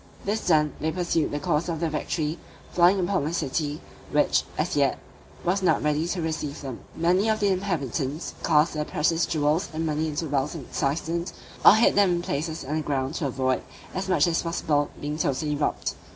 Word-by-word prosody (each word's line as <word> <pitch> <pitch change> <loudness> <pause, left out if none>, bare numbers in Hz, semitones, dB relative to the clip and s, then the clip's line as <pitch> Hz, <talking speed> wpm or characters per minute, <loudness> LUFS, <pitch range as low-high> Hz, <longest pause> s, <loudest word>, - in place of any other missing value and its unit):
This 210 +2 -1
done, 150 -3 +3
they 160 - 0
pursued 170 -2 0
the 145 - -3
course 170 0 0
of 165 -2 -2
their 165 -1 -1
victory, 155 +1 -2 0.3
falling 180 +3 +5
upon 180 -2 +1
the 155 +3 -2
city, 150 -1 -2 0.3
which, - - +3 0.2
as - - 0
yet, - - +2 0.5
was 185 +3 +1
not 185 - +2
ready 150 +2 +1
to 175 -1 -2
receive 155 -2 -3
them. 135 -4 -6 0.2
Many 180 +6 +2
of 215 0 +1
the 205 - +2
inhabitants 155 - -2
cast 150 +3 +3
their 150 - -1
precious 165 +3 +1
jewels 155 +3 +1
and 160 +1 -2
money 155 0 0
into 155 +2 -2
wells 145 +2 -1
and 145 -6 -7
cisterns, 165 +4 -1 0.3
or - - +9
hid 220 - +4
them 200 -3 +4
in 175 - 0
places 160 +1 -3
underground, 145 -2 -1
to 160 -3 -1
avoid, 130 0 0 0.3
as 190 0 -3
much 170 -6 +4
as 170 -1 +1
possible, 155 -3 0
being 150 +1 -4
totally 150 +1 0
robbed. 145 - -1
160 Hz, 190 wpm, -26 LUFS, 150-175 Hz, 0.5 s, or